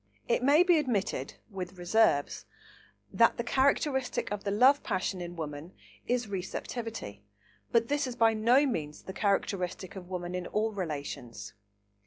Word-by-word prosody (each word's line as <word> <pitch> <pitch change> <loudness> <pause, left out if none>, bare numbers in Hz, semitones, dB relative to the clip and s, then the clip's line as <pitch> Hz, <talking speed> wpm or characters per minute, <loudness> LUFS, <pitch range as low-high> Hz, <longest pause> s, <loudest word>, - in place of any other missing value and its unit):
It - - +2
may 285 +6 +6
be 350 -3 +4
admitted, 205 - -2 0.2
with 185 -1 -6
reserves, 175 -5 +2 0.7
that - - +4
the - - -1
characteristic 265 -2 +1
of 205 -1 -3
the 200 - -1
love 255 +8 +5
passion 190 -2 -2
in 175 0 -6
woman 155 +1 -6 0.3
is 245 -2 0
receptivity, 195 - -5 0.5
but 230 -1 +3
this 290 0 0
is 250 - -5
by 225 -1 +4
no 240 +6 +4
means 155 - -3
the 190 - -7
characteristic 195 -3 -1
of 180 -2 -9
woman 180 -1 -4
in 180 -1 -3
all 220 +1 0
relations. 140 - -5
200 Hz, 150 wpm, -30 LUFS, 175-240 Hz, 0.7 s, may